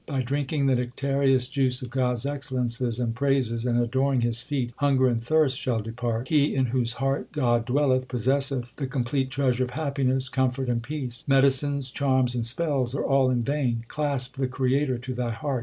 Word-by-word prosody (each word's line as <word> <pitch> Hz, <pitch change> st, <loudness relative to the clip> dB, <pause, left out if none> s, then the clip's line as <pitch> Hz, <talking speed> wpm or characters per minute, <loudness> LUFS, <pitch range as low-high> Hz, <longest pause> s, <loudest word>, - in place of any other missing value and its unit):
By 135 Hz, -4 st, -1 dB
drinking 140 Hz, +2 st, -1 dB
the 135 Hz, -, +3 dB
nectareous 130 Hz, +1 st, +1 dB
juice 130 Hz, -2 st, 0 dB
of 125 Hz, -, -7 dB
God 125 Hz, -1 st, +1 dB
s 120 Hz, +1 st, -4 dB
excellences 125 Hz, -4 st, -2 dB
and 120 Hz, -2 st, -1 dB
praises 125 Hz, -3 st, 0 dB
And 120 Hz, 0 st, +2 dB
adoring 130 Hz, +2 st, +1 dB
His 120 Hz, 0 st, 0 dB
feet, 130 Hz, -3 st, -3 dB
hunger 135 Hz, -2 st, +3 dB
and 120 Hz, -2 st, 0 dB
thirst 140 Hz, 0 st, +2 dB
shall 120 Hz, -3 st, -1 dB
depart. 115 Hz, +2 st, -3 dB
He 145 Hz, -3 st, +2 dB
in 130 Hz, -1 st, +2 dB
whose 120 Hz, -1 st, 0 dB
heart 135 Hz, +2 st, -2 dB
God 120 Hz, -6 st, +1 dB
dwelleth, 130 Hz, 0 st, +1 dB
Possesseth 130 Hz, 0 st, 0 dB
the 135 Hz, -, -3 dB
complete 130 Hz, +1 st, -1 dB
treasure 130 Hz, -2 st, +1 dB
of 125 Hz, -, -3 dB
happiness, 135 Hz, -3 st, 0 dB
comfort, 130 Hz, 0 st, -1 dB
and 120 Hz, -1 st, 0 dB
peace. 125 Hz, -2 st, -4 dB
Medicines, 135 Hz, 0 st, +3 dB
charms, 130 Hz, -3 st, +1 dB
and 120 Hz, -2 st, -1 dB
spells 135 Hz, -2 st, -1 dB
are -, -, -1 dB
all 135 Hz, -1 st, +3 dB
in 125 Hz, -2 st, 0 dB
vain: 125 Hz, -4 st, -1 dB
Clasp 140 Hz, -4 st, -1 dB
the 130 Hz, -1 st, 0 dB
Creator 130 Hz, +1 st, 0 dB
to 130 Hz, +2 st, -6 dB
thy 120 Hz, -1 st, -2 dB
heart. 130 Hz, +3 st, -2 dB
130 Hz, 190 wpm, -25 LUFS, 120-140 Hz, -, the